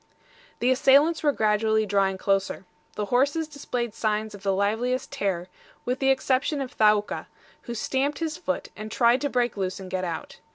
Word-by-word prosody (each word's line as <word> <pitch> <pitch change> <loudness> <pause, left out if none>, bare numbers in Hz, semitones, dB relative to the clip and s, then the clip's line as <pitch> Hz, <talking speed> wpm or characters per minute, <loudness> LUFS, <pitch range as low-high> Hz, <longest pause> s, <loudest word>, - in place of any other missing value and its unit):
The 250 +2 +3
assailants 285 +5 +4
were 295 - +3
gradually 220 -2 +2
drawing 195 -1 +1
closer. 195 0 -1 0.3
The 210 - -2
horses 285 +5 +2
displayed 250 -6 -4
signs 215 -1 -1
of 200 - -10
the 195 0 0
liveliest 220 +6 0
terror, 185 -3 -2 0.4
with 250 +2 -1
the 270 - +2
exception 270 +2 +1
of 265 -2 -4
Thaouka, 210 -1 +2 0.4
who 235 - -3
stamped 275 +5 -1
his 320 -2 -2
foot, 300 -5 -3
and 215 +1 -7
tried 240 +1 +3
to 285 - 0
break 245 -4 0
loose 185 -1 -2
and 185 -1 -9
get 185 0 -1
out. 170 -3 -5
235 Hz, 175 wpm, -26 LUFS, 205-270 Hz, 0.4 s, assailants